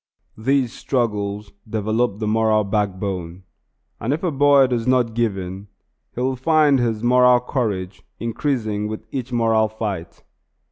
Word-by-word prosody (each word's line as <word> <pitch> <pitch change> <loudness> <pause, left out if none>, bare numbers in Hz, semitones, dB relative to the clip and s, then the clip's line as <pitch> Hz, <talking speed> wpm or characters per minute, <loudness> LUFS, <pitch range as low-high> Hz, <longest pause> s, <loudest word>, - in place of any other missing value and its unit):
These 130 +1 +1
struggles 105 -5 -2 0.2
develop 110 0 0
the 110 - -3
moral 110 0 +2
backbone; 95 -3 -3 0.6
and 115 - -2
if 160 - -4
a 175 - +1
boy 140 -1 +5
does 125 -2 -2
not 125 -3 +2
give 115 -4 0
in, 95 +2 -7 0.5
he 125 - -3
will 130 +1 0
find 145 +1 +3
his 115 -2 -1
moral 125 0 +5
courage 100 -8 -3 0.2
increasing 115 -3 -2
with 110 0 -6
each 130 -2 -4
moral 115 -2 +2
fight. 105 -6 -5
115 Hz, 140 wpm, -21 LUFS, 105-125 Hz, 0.6 s, boy